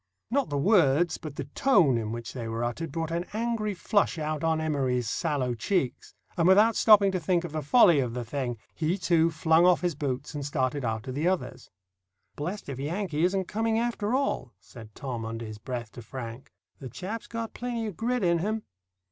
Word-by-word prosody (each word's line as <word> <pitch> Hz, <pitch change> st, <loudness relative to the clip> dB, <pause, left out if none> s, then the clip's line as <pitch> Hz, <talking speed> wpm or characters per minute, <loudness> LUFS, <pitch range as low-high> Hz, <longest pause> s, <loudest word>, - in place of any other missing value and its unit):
Not 275 Hz, +1 st, +1 dB
the 145 Hz, -, -1 dB
words, 170 Hz, -2 st, +3 dB
but 155 Hz, -3 st, -8 dB
the 145 Hz, -, -3 dB
tone 155 Hz, -, +3 dB
in 110 Hz, -2 st, -2 dB
which 115 Hz, 0 st, -6 dB
they 120 Hz, -3 st, -5 dB
were 115 Hz, +1 st, -3 dB
uttered, 135 Hz, +7 st, -3 dB
brought 165 Hz, +1 st, -3 dB
an 170 Hz, +2 st, -2 dB
angry 220 Hz, -2 st, -1 dB
flush 200 Hz, 0 st, +1 dB
out 155 Hz, -1 st, -3 dB
on 160 Hz, -1 st, +2 dB
Emory's 135 Hz, -6 st, 0 dB
sallow 140 Hz, -3 st, -1 dB
cheeks, 130 Hz, -, -2 dB, 0.2 s
and 170 Hz, 0 st, +2 dB
without 210 Hz, +4 st, +6 dB
stopping 205 Hz, -3 st, +6 dB
to 185 Hz, -, -1 dB
think 175 Hz, +1 st, +1 dB
of 175 Hz, -, -5 dB
the 155 Hz, 0 st, -2 dB
folly 165 Hz, -, +6 dB
of 125 Hz, -3 st, -1 dB
the 120 Hz, -1 st, -3 dB
thing, 125 Hz, -1 st, -3 dB, 0.2 s
he 165 Hz, +4 st, 0 dB
too 170 Hz, -3 st, +3 dB
flung 160 Hz, +1 st, +3 dB
off 180 Hz, 0 st, +5 dB
his 175 Hz, -2 st, 0 dB
boots 140 Hz, -1 st, -3 dB
and 145 Hz, -1 st, -4 dB
started 135 Hz, -1 st, -1 dB
after 115 Hz, +2 st, -3 dB
the 145 Hz, +6 st, -1 dB
others. 185 Hz, -1 st, -2 dB, 0.7 s
"Blessed 180 Hz, +8 st, -5 dB
if 135 Hz, -2 st, -5 dB
Yankee 160 Hz, +1 st, -2 dB
isn't 190 Hz, +1 st, 0 dB
coming, 220 Hz, +3 st, 0 dB
after 235 Hz, -1 st, 0 dB
all," 135 Hz, -, -1 dB
said 110 Hz, +3 st, -13 dB
Tom, 125 Hz, -4 st, -5 dB
under 115 Hz, +1 st, -5 dB
his 110 Hz, -1 st, -8 dB
breath, 120 Hz, -1 st, -5 dB
to 120 Hz, -, -10 dB
Frank. 120 Hz, +2 st, -8 dB, 0.3 s
"The 130 Hz, -, -7 dB
chap's 205 Hz, -, -6 dB
got 230 Hz, -1 st, -5 dB
plenty 240 Hz, -2 st, -3 dB
of 210 Hz, -5 st, -5 dB
grit 245 Hz, +2 st, -1 dB
in 170 Hz, -1 st, +3 dB
him." 215 Hz, +4 st, -2 dB
160 Hz, 200 wpm, -28 LUFS, 130-195 Hz, 0.7 s, without